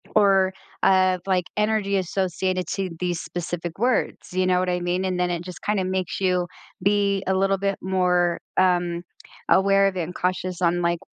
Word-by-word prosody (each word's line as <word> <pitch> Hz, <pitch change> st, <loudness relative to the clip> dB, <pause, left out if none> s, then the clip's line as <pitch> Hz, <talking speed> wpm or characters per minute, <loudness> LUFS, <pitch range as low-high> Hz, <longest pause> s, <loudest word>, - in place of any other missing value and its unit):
or, 195 Hz, -2 st, +4 dB, 0.3 s
uh, 185 Hz, -1 st, +4 dB
like, 185 Hz, -1 st, +2 dB
energy 210 Hz, -2 st, +1 dB
associated 185 Hz, 0 st, -1 dB
to 190 Hz, -2 st, -2 dB
these 175 Hz, -2 st, -1 dB
specific 175 Hz, +1 st, -5 dB
words, 245 Hz, -4 st, 0 dB
you 185 Hz, 0 st, +1 dB
know 180 Hz, -1 st, +3 dB
what 185 Hz, -, 0 dB
I 180 Hz, 0 st, 0 dB
mean? 175 Hz, +1 st, -1 dB
And 185 Hz, -1 st, -1 dB
then 180 Hz, 0 st, +1 dB
it 170 Hz, -1 st, -2 dB
just 180 Hz, 0 st, -9 dB
kinda 205 Hz, -2 st, 0 dB
makes 185 Hz, 0 st, -2 dB
you 180 Hz, -1 st, +1 dB, 0.3 s
be 200 Hz, 0 st, +2 dB
a 190 Hz, -, +2 dB
little 195 Hz, +1 st, +2 dB
bit 195 Hz, 0 st, -1 dB
more, 180 Hz, -2 st, +1 dB, 0.2 s
um, 175 Hz, -2 st, +2 dB, 0.5 s
aware 195 Hz, +1 st, +4 dB
of 190 Hz, -, -8 dB
it 175 Hz, -, 0 dB
and 180 Hz, +3 st, -7 dB
cautious 185 Hz, 0 st, -2 dB
on, 175 Hz, 0 st, +2 dB
like, 170 Hz, 0 st, +1 dB
185 Hz, 185 wpm, -24 LUFS, 175-195 Hz, 0.5 s, or